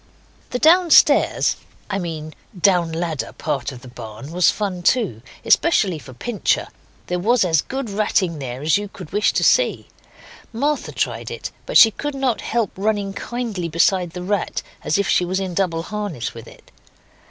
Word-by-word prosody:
The 250 - -2
downstairs 335 +4 +5 0.3
I 195 -1 -2
mean 155 -3 -5 0.3
down 175 -3 +3
ladder 165 -2 -3
part 140 -6 -3
of 125 -2 -11
the - - -10
barn 120 +2 -9
was 180 +1 +4
fun 195 -4 -2
too, 185 - +1 0.2
especially 200 - +3
for 135 - -12
Pincher. 225 - -1 0.4
There 180 0 -2
was 220 +2 +3
as 160 -4 +3
good 265 -1 -5
ratting 195 -5 0
there 130 0 -6
as 155 +5 +3
you 205 - -5
could 185 -5 -11
wish 210 +1 +3
to - - +1
see. - - +2 0.6
Martha 285 +6 -1
tried - - -2
it, - - -6 0.2
but - - +3
she 225 - +9
could 290 +5 -5
not 265 -4 0
help 230 -3 -1
running 200 0 -1
kindly 220 -6 -4
beside 175 +2 +2
the 180 0 -6
rat, 200 +1 -2 0.2
as 155 - +1
if 200 - 0
she - - +3
was 185 +2 -1
in 190 -2 -3
double 170 -3 0
harness 205 - -4
with 115 - -11
it. - - -17
185 Hz, 175 wpm, -21 LUFS, 165-215 Hz, 0.6 s, she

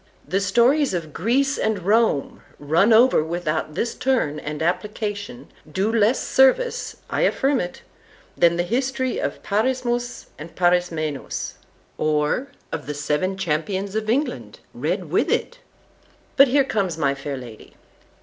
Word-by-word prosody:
The 190 - +1
stories 240 +5 +3
of 155 -4 -5
Greece 270 +7 +1
and 215 -5 -1
Rome, 215 -8 +2 0.2
run 165 +9 +2
over 230 -6 +5
without 160 -2 -3
this 235 - -1
turn 240 - 0
and 150 0 -5
application,—do 205 +1 -3
less 225 +2 +3
service, 265 - +2
I - - -2
affirm 270 0 +2
it, 175 - -5 0.5
than 170 0 +4
the 175 - 0
history 260 +5 -1
of - - -4
Parismus 245 +2 -1
and 155 +3 -10
Parismenus, 175 -5 0 0.5
or 155 - +1 0.2
of 160 -3 -5
the 150 - -4
Seven 150 +6 -1
Champions 190 +3 -2
of 215 0 -2
England, 275 +6 -2
read - - -3
with - - +2
it. 485 - -1 0.8
———But 275 0 +7
here 275 +2 +3
comes 195 - -1
my 140 -3 +1
fair 140 0 -5
lady. 120 -4 -11
195 Hz, 135 wpm, -22 LUFS, 155-245 Hz, 0.8 s, But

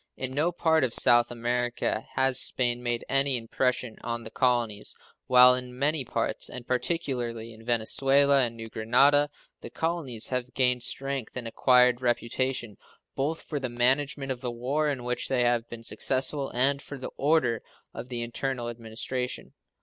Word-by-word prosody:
In 130 0 -4
no 155 +5 +1
part 160 -3 +2
of 125 -3 -1
South 120 0 +5
America 120 0 -2
has 130 -1 +3
Spain 120 -1 +2
made 120 -1 -2
any 135 -1 +2
impression 125 0 -2
on 120 0 -4
the 110 - -9
colonies, 120 -4 0 0.3
while 125 0 +8
in 125 0 -4
many 145 +1 +1
parts, - - -1
and 125 -2 -8
particularly 125 -5 -2
in 110 0 -15
Venezuela 135 +4 +3
and 115 -1 -3
New 115 0 -7
Grenada, 135 +7 +3 0.3
the - - -7
colonies 160 -9 -1
have 125 -1 -3
gained 125 -1 +2
strength 135 0 -3
and 120 -2 -4
acquired 125 +1 +3
reputation, 120 -2 -1 0.4
both 150 +4 -2
for 150 - -3
the 130 -2 -3
management 135 +3 0
of 125 -1 -5
the 125 - -3
war 135 +6 -1
in 130 -4 -3
which 125 0 -2
they 125 -2 +1
have 120 -1 0
been 115 -1 -9
successful 135 +3 0
and 140 +3 +2
for 145 +1 -9
the 130 - -7
order 135 -6 +1 0.3
of 120 +2 -8
the 120 -2 -3
internal 120 0 -3
administration. 120 +2 -5
125 Hz, 165 wpm, -27 LUFS, 120-135 Hz, 0.4 s, while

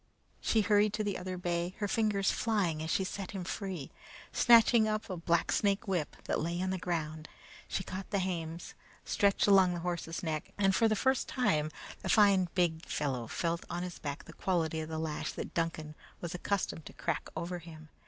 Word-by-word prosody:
She 225 - +2
hurried 210 0 +3
to 215 0 -1
the 205 -2 -1
other 185 0 -4
bay, 175 0 -2
her 205 - -1
fingers 205 -2 +2
flying 195 -9 0
as 160 - -3
she 190 - +2
set 190 0 -5
him 190 -2 -4
free. 185 -5 -4 0.4
Snatching 230 -1 +6
up 215 -2 -2
a - - -2
big 170 - -12
blacksnake 195 +5 +2
whip 180 -6 -1
that - - -1
lay 170 +2 -2
on 185 +1 0
the 190 - -2
ground, 155 -3 -3 0.4
she 190 - -2
caught 190 +1 -6
the 200 - 0
hames, 170 -3 -3 0.3
stretched 200 -1 +3
along 190 -3 +5
the 170 - -4
horse's 170 -1 -3
neck, 155 -2 -3
and, 195 -1 +3
for 225 +4 +4
the 215 - +2
first 265 +5 +1
time, 190 - +1 0.3
the - - -4
fine, 195 -4 +5
big 170 -2 +1
fellow 130 -6 -2
felt 170 +5 -1
on 175 +1 -3
his 180 -1 -6
back 145 -1 -5
the - - -11
quality 165 -4 0
of 155 0 -4
the 160 - -3
lash 155 -1 -3
that - - -6
Duncan 165 -2 -2 0.3
was 170 -1 -5
accustomed 180 -3 -2
to - - -10
crack 170 -3 -2
over 175 +2 -3
him. 160 -2 -12
180 Hz, 200 wpm, -32 LUFS, 165-200 Hz, 0.4 s, Snatching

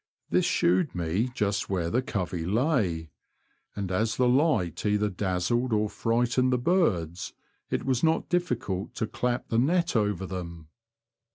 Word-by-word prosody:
This - - +3
shewed 90 +2 +2
me 90 +8 0
just 100 -3 -1
where 85 -3 -1
the 125 - +2
covey 90 -9 -3
lay, 95 - 0 0.6
and 100 -2 -3
as 110 +4 0
the 125 - +3
light 125 - +2
either 105 0 +1
dazzled 100 +6 -1
or 105 -1 +1
frightened 120 +2 +1
the 125 - +3
birds, 95 - 0 0.4
it - - -2
was 130 -2 0
not 160 0 +2
difficult 105 - -2
to 110 - -1
clap 120 +2 -2
the 115 - +2
net 170 +5 +2
over 105 -3 +1
them. 85 -4 -7
105 Hz, 150 wpm, -27 LUFS, 90-125 Hz, 0.6 s, This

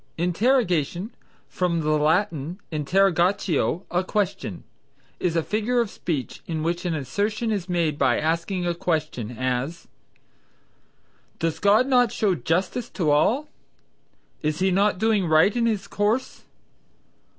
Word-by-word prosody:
Interrogation 180 - +1 0.3
(from 170 -2 -1
the 155 0 0
Latin 160 +2 +1
interrogatio, 175 +2 +1
a 180 +1 +1
question), 195 -3 -2 0.6
is 175 -2 0
a 165 - +2
figure 220 +6 0
of 230 -4 0
speech 150 -7 -4
in 160 -2 -3
which 170 +3 -2
an 170 -2 0
assertion 205 - -2
is 195 -4 -3
made 165 -4 0
by 135 - +3
asking 170 +4 -1
a 175 - +1
question; 155 - -2
as, 130 +6 -2 1.5
"Does 165 -1 -2
God 210 +5 +4
not 250 -4 +3
show 205 -3 +1
justice 180 +8 -1
to 160 -6 0
all?" 240 - +2 0.9
"Is 150 0 -1
he 190 +2 +2
not 200 +2 +2
doing 215 -3 +2
right 160 +7 +4
in 235 -1 +2
his 210 -4 -1
course?" 215 +5 -1
180 Hz, 130 wpm, -24 LUFS, 160-205 Hz, 1.5 s, God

